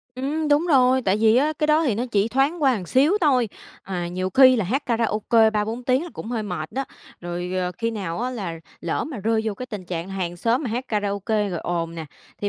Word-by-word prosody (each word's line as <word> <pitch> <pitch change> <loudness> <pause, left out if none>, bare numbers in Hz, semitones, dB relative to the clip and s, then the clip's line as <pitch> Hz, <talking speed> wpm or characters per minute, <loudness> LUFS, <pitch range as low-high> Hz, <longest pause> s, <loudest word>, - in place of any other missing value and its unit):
Ừm, 295 +4 -2
đúng 295 +4 +3
rồi. 260 -4 +4
Tại 195 0 +2
vì 220 +1 +4
á, 295 +4 +3
cái 300 - +1
đó 310 +1 +3
thì 245 - +1
nó 235 +4 -1
chỉ 205 +1 +2
thoáng 280 +6 +1
qua 270 - +5
một 190 -4 -4
xíu 275 - +3
thôi, 255 -8 +3 0.3
à, 180 -3 -4
nhiều 185 +1 -3
khi 255 +4 +7
là 215 - 0
hát 270 +9 -2
karaoke 225 -1 +2
3-4 220 +3 -2
tiếng 260 +4 +2
là 350 - -6
cũng - - -8
hơi 230 -3 -2
mệt 175 -6 -5
đó. 270 +1 -2 0.4
Rồi, 175 +1 -4
ờ, 180 -1 -1
khi 230 0 0
nào 195 -3 -4
á 250 - -1
là 180 -9 -5 0.2
lỡ 170 - -2
mà 295 -5 -6
rơi 220 +2 +1
vô 215 -2 -1
cái 255 +5 -7
tình 210 -6 -7
trạng 175 0 -4
hàng 185 -3 -4
xóm 230 - +1
mà 245 - -3
hát 245 +3 -2
karaoke 205 0 -1
rồi 175 - -3
ồn 170 -1 -3
nè, 160 -2 -6 0.3
thì 205 - 0
220 Hz, 245 wpm, -23 LUFS, 185-260 Hz, 0.4 s, khi